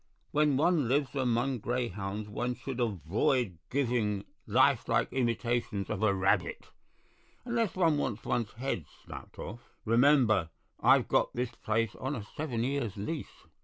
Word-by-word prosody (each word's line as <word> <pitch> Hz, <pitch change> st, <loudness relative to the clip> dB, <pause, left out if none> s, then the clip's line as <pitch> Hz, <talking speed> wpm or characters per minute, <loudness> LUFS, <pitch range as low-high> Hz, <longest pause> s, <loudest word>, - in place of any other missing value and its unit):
When 150 Hz, -2 st, +3 dB
one 155 Hz, -3 st, +3 dB
lives 135 Hz, +1 st, +1 dB
among 125 Hz, -1 st, 0 dB
greyhounds 105 Hz, -3 st, -3 dB
one 120 Hz, +4 st, -2 dB
should 130 Hz, +1 st, -6 dB
avoid 100 Hz, -, 0 dB
giving 115 Hz, -7 st, 0 dB, 0.2 s
life -, -, +3 dB
like -, -, +1 dB
imitations 120 Hz, -5 st, -1 dB
of 95 Hz, -, -2 dB
a 110 Hz, -2 st, +4 dB
rabbit, 95 Hz, -1 st, 0 dB, 0.7 s
unless 230 Hz, -5 st, 0 dB
one 165 Hz, -5 st, +3 dB
want's 110 Hz, -6 st, -3 dB
one's 115 Hz, -3 st, -1 dB
head 115 Hz, -, -3 dB, 0.2 s
snapped -, -, -10 dB
off. 105 Hz, +6 st, -6 dB, 0.3 s
Remember, 115 Hz, -, +4 dB, 0.3 s
I've -, -, +5 dB
got -, -, +2 dB
this 125 Hz, 0 st, -1 dB
place 110 Hz, -2 st, -1 dB
on 135 Hz, +3 st, -3 dB
a 110 Hz, -, -5 dB
seven 125 Hz, -7 st, -2 dB
years' 125 Hz, -6 st, -2 dB
lease. 140 Hz, +10 st, -5 dB
120 Hz, 140 wpm, -30 LUFS, 105-135 Hz, 0.7 s, I've